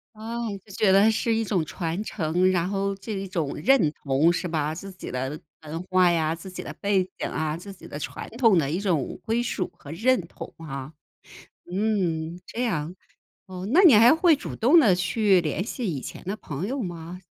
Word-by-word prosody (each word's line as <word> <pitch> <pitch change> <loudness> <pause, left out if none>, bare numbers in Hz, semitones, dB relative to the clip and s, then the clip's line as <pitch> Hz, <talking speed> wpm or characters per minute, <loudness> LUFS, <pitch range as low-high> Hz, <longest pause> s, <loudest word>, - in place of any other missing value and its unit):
啊， 230 +2 -4 0.2
就 205 - -16
觉 205 -2 +3
得 200 +3 +6
是 225 +1 +1
一 225 0 +1
种 185 -7 0
传 170 +4 -3
承， 180 -1 +1
然 180 0 0
后 200 0 -1
这 205 +3 -7
一 195 0 -4
种 165 -6 -2
认 165 - +3
同 140 +4 +2
是 175 +1 -2
吧。 155 -2 -1
自 195 +4 -8
己 185 - -9
的 130 +4 -3 0.2
文 160 +3 -5
化 185 -1 +4
呀、 160 -1 +1
自 185 +3 -10
己 - - -6
的 - - -7
背 200 -2 +1
景 - - -2
啊、 155 0 -2
自 195 +3 -9
己 - - -13
的 - - -7
传 150 - -6
统 225 -6 +5
的 140 - 0
一 170 +5 -1
种 175 -9 -1
归 225 +2 +1
属 235 -6 -2
和 145 - -11
认 240 +7 +2
同 - - -10
啊， 140 -1 -7 0.8
嗯， 180 -5 -1
这 245 - -3
样。 170 -6 -2 0.5
哦， 185 0 -7
那 350 - +6
你 330 -9 +8
还 235 +7 +7
会 330 -2 +4
主 - - -7
动 275 +10 +5
的 225 - +6
去 185 +1 +3
联 165 +4 -2
系 245 +1 -5
以 140 - -3
前 - - -8
的 195 +4 -3
朋 150 +1 -5
友 270 +1 -2
吗？ 175 0 -6
185 Hz, 220 characters per minute, -25 LUFS, 160-215 Hz, 0.8 s, 你